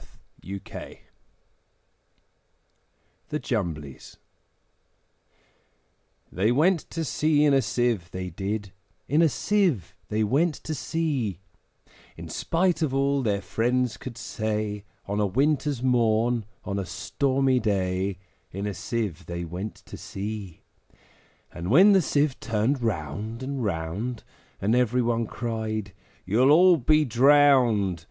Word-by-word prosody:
Edward 95 +1 -6
Lear - - -8 2.3
The 150 - -1
Jumblies 80 - -4 2.1
THEY 105 +5 +1
went 165 +6 +2
to 165 - -3
sea 150 +4 +2
in 145 - +4
a 135 - +4
Sieve, 120 -9 0
they 90 0 -5
did, 100 +2 -4 0.4
In 150 +4 +3
a 165 - +5
Sieve 145 - 0
they 110 +1 +1
went 150 +9 +2
to 160 - -6
sea: 140 - -2 0.8
In - - -8
spite 180 +1 0
of 140 -4 0
all 140 0 +2
their 100 -5 -1
friends 120 +1 0
could 125 -3 -8
say, 105 -2 -3 0.2
On 100 +1 -2
a 105 - +2
winter's 140 +3 0
morn, 120 -2 +2 0.2
on 100 0 -2
a 95 - -3
stormy 135 - +1
day, 95 -3 -1 0.3
In 100 +2 -4
a 105 - -2
Sieve 95 -4 -4
they 85 0 -4
went 90 +6 -5
to - - -9
sea! 100 -3 -6 0.9
And 85 +1 -5
when 185 - +7
the 195 -2 +5
Sieve 145 -3 0
turned 115 +5 0
round 105 - -3
and 135 -1 -3
round, 100 +6 -3 0.4
And 105 +3 +1
every 125 0 +2
one 115 -1 0
cried, 110 -3 -4 0.3
`You'll 120 +8 +4
all 175 +3 +7
be 155 +3 +3
drowned!' 125 -7 +4
115 Hz, 125 wpm, -26 LUFS, 100-140 Hz, 2.3 s, when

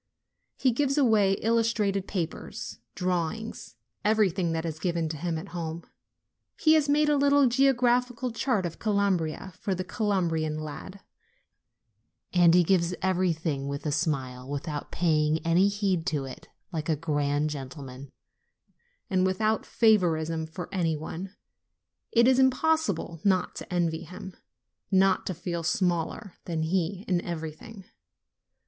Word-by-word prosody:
He 260 - +3
gives 275 +3 0
away 215 -8 +4
illustrated 220 -4 +1
papers, 175 -5 -5 0.2
drawings, 180 - -3 0.3
everything 195 -5 +2
that 165 0 -2
is 160 -1 -4
given 170 -1 -1
him 160 +2 -3
at 175 +5 -7
home. 165 -1 -5 0.8
He 315 - +5
has 305 -2 +3
made 300 +1 +4
a 295 - +3
little 285 0 +4
geographical 250 -1 +2
chart 225 -4 0
of 170 - -5
Calabria 195 -4 0
for 195 - -1
the 185 - -3
Calabrian 175 -6 -1
lad; 155 +6 -8 1.3
and 175 -2 +6
he 180 - +6
gives 175 0 +2
everything 165 -6 0
with 140 +2 -5
a 150 - 0
smile, 135 -4 -2
without 145 +1 -4
pay 165 -3 +2
ing 150 +1 +2
any 175 +4 +4
heed 200 -5 0
to 145 -3 -1
it, 130 - -10 0.2
like 160 -3 -4
a 160 - +3
grand 145 -1 0
gentleman, 135 -1 -8 1.0
and 185 -1 +1
without 215 +4 +1
favoritism 165 -7 +2
for 175 +3 -7
any 165 -4 0
one. 180 +6 -7 0.8
It 235 +1 +5
is 260 0 +5
impossible 260 - +1
not 185 -3 +2
to - - -8
envy 170 -2 0
him, 180 +2 -9 0.5
not 190 -1 +3
to 185 - -2
feel 170 0 -4
smaller 180 +1 -1
than 165 -2 -2
he 185 +4 -1
in 180 -2 +1
everything. 170 +5 -7
180 Hz, 135 wpm, -27 LUFS, 160-210 Hz, 1.3 s, and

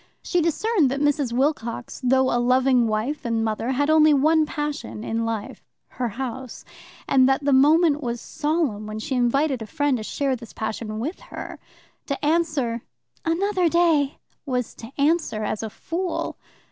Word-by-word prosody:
She 355 - +1
discerned 335 - +2
that 275 +2 -2
Mrs. 290 -3 +1
Wilcox, 245 -2 -1
though 260 +1 +3
a 240 - +2
loving 255 -1 +3
wife 220 +7 -2
and 230 -1 0
mother, 220 +2 -2
had 285 +3 +1
only 310 -1 +6
one 310 +2 +3
passion 295 -8 -4
in 230 0 -1
life 225 +3 -4 0.3
her 250 - -3
house 255 +2 -6 0.4
and 260 -1 +5
that 270 +2 +1
the 285 - +3
moment 300 +3 +5
was 240 -3 -3
solemn 295 -10 -1
when 215 0 -5
she 220 +5 -4
invited 260 +2 +1
a 220 - -6
friend 285 +3 0
to 220 - -5
share 270 +4 -1
this 235 -2 -11
passion 220 0 -4
with 290 - -4
her. - - -7 0.5
To 280 0 -3
answer 300 -8 +1 0.4
"another 365 +1 +1
day" 320 -5 +2 0.3
was 250 -4 -2
to 225 +2 -11
answer 290 -7 +1
as 210 - -2
a 220 - -4
fool. 345 - -3
270 Hz, 165 wpm, -24 LUFS, 235-305 Hz, 0.5 s, only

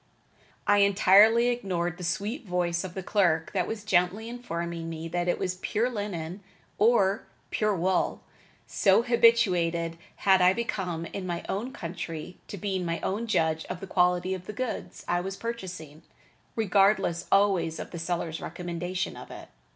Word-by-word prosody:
I 205 0 +4
entirely 205 +4 +6
ignored 180 -8 -2
the - - -6
sweet 205 - -2
voice 180 -3 -1
of 185 -2 -7
the 190 - -4
clerk 175 -6 +2
that 185 -3 0
was 215 -2 -5
gently 195 +3 +1
informing 170 -8 -4
me 165 0 -5
that 175 +1 -1
it 175 - +1
was 185 -1 -2
"pure 235 +4 0
linen" 190 -5 -4 0.4
or 205 -3 +3 0.2
"pure 215 -1 +1
wool," 185 +1 0 0.4
so 195 +3 +3
habituated 180 -9 +3 0.2
had 190 -2 +4
I 180 +1 +6
become 185 -7 -3
in 185 +2 -6
my 170 -1 -3
own 225 +7 -3
country 170 -1 -6
to 200 - -7
being 190 -1 -2
my 170 -1 -2
own 215 +5 -2
judge 160 -6 +1
of 185 - -5
the 195 - -6
quality 180 0 +2
of 185 -1 -7
the 210 - -5
goods 255 0 -5
I 175 0 +1
was 195 +1 -5
purchasing, 180 -10 -6 0.5
regardless 200 -4 +2
always 195 -5 +3
of - - -7
the 170 - -6
seller's 165 -1 -3
recommendation 175 +2 -4
of - - -10
it. - - -10
185 Hz, 160 wpm, -28 LUFS, 170-205 Hz, 0.5 s, entirely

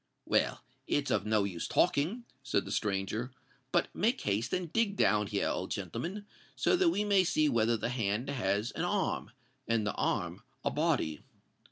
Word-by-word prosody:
"Well—it's 145 0 -1
of 105 0 +1
no 105 -1 +3
use 90 -4 -3
talking," 180 - +1 0.2
said 130 -7 0
the 100 - -6
stranger: 105 +4 -1 0.4
"but - - +1
make 235 +6 +1
haste 105 +3 0
and 175 -3 -2
dig 225 -3 +2
down 105 - +3
here, - - 0
old - - -2
gentleman—so 205 - -2
that 360 -1 +4
we 210 -10 +1
may 200 -2 +4
see 155 -3 +2
whether 115 -3 +2
the 115 - -2
hand 115 -1 -1
has 110 -4 0
an - - -4
arm, 185 0 0 0.4
and 115 -2 +1
the 100 - -1
arm - - -1 0.2
a - - +2
body." 80 -1 0
125 Hz, 165 wpm, -32 LUFS, -, 0.4 s, that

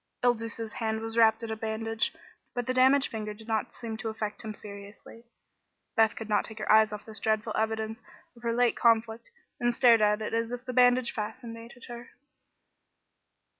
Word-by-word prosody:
Il 245 -1 +5
Duca's 230 -1 -4
hand 220 -1 -2
was 225 0 -5
wrapped 225 0 +4
in 225 - -4
a - - -1
bandage, 225 0 -1 0.4
but 245 -1 -2
the 255 - -1
damaged 265 +2 +4
finger 215 -1 -5
did 220 +1 -14
not 220 -2 -1
seem 225 -2 -6
to 225 0 -4
affect 215 -1 -4
him 220 - -4
seriously. 205 +2 -11 0.7
Beth 225 -1 +4
could 225 - -6
not 210 - +2
take 220 - -9
her 215 - -1
eyes 215 0 +6
off 210 -1 -7
this 215 -2 -4
dreadful 215 +1 0
evidence 220 +1 -2 0.3
of 235 - -17
her 235 -1 -1
late 240 0 +2
conflict, 230 0 +2 0.3
and 240 0 +1
stared 235 -3 +6
at 210 0 +3
it 215 - -4
as 230 0 0
if 245 +1 -6
the 255 - -4
bandage 245 0 +4
fascinated 230 +1 -7
her. 240 0 -9
225 Hz, 190 wpm, -28 LUFS, 220-235 Hz, 0.7 s, eyes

